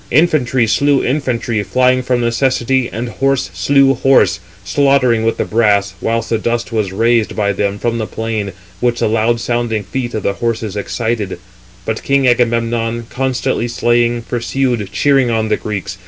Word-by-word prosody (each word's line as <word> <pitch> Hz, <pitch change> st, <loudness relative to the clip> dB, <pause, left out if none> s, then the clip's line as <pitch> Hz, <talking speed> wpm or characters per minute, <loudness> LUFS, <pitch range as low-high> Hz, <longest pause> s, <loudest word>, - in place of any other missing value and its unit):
Infantry 130 Hz, -5 st, +2 dB
slew 140 Hz, +5 st, +2 dB
infantry, 120 Hz, -5 st, -1 dB
flying 130 Hz, +3 st, +2 dB
from 125 Hz, -1 st, 0 dB
necessity, 125 Hz, +1 st, +1 dB
and 115 Hz, +3 st, -4 dB
horse 135 Hz, +3 st, -1 dB
[slew] 140 Hz, -1 st, +3 dB
horse, 125 Hz, -9 st, +3 dB, 0.2 s
slaughtering 125 Hz, +1 st, +2 dB
with 115 Hz, -, 0 dB
the -, -, -1 dB
brass 100 Hz, -3 st, +2 dB
(whilst 115 Hz, 0 st, -1 dB
the 115 Hz, -, +1 dB
dust 120 Hz, +2 st, -2 dB
was 105 Hz, -4 st, -1 dB
raised 115 Hz, +2 st, +1 dB
by 100 Hz, -1 st, 0 dB
them 100 Hz, +1 st, -1 dB
from 115 Hz, +2 st, -2 dB
the 110 Hz, -, -3 dB
plain, 110 Hz, -3 st, -3 dB, 0.3 s
which 120 Hz, +1 st, 0 dB
the -, -, +1 dB
loud 115 Hz, +2 st, +1 dB
sounding 120 Hz, -3 st, -1 dB
feet 120 Hz, +4 st, -4 dB
of 110 Hz, -, -3 dB
the 100 Hz, -, 0 dB
horses 115 Hz, -2 st, -3 dB
excited); 105 Hz, -2 st, -2 dB, 0.5 s
but 110 Hz, 0 st, -3 dB
king 140 Hz, -1 st, +2 dB
Agamemnon, 115 Hz, -1 st, +1 dB
constantly 130 Hz, -2 st, -1 dB
slaying, 120 Hz, 0 st, +1 dB
pursued, 120 Hz, -3 st, -2 dB
cheering 135 Hz, +6 st, +2 dB
on 110 Hz, -1 st, 0 dB
the -, -, +3 dB
Greeks. 95 Hz, -3 st, -5 dB
115 Hz, 160 wpm, -16 LUFS, 110-125 Hz, 0.5 s, slew